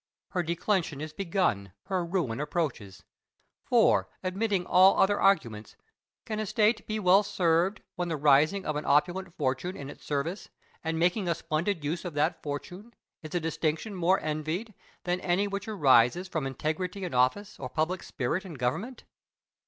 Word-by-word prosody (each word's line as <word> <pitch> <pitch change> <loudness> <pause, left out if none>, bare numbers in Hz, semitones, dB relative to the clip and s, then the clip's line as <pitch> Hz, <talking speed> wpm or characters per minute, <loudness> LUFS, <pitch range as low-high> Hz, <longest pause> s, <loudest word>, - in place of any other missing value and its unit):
Her 180 - -1
declension 170 -2 -1
is 155 0 -6
begun, 170 - -1
her 185 -2 -1
ruin 170 -10 -2
approaches; 145 - -3 0.6
for, - - +3
omitting 190 0 0
all 185 +2 +6
other 205 +1 +3
arguments, 115 - +1 0.5
can 215 -1 -3
a 215 - -2
state 215 +3 +2
be 215 - -2
well 195 -1 +5
served 180 0 +1
when 175 -1 -1
the 160 -2 -2
raising 150 +7 +4
of 155 - -1
an 150 - -2
opulent 175 +6 +2
fortune 140 +6 -1
in 140 0 -7
its - - -14
service, 155 +7 -3 0.3
and 160 0 -1
making 180 +4 +1
a 170 - +1
splendid 165 +1 -2
use 165 +4 -2
of 175 -5 -6
that 155 +3 0
fortune, 180 +10 -7 0.3
is 155 +2 -8
a - - +3
distinction 160 +4 -2
more 185 +1 +2
envied 155 +8 -3 0.3
than 180 0 -1
any 190 +3 +1
which 200 +1 -4
arises 145 - +4
from 160 -6 -2
integrity 180 +8 -3
in 180 - -4
office 130 +12 +1
or 130 - -5
public 160 +7 -1
spirit 145 +8 -2
in 180 -5 -9
government? 145 - -3
170 Hz, 165 wpm, -28 LUFS, 150-190 Hz, 0.6 s, all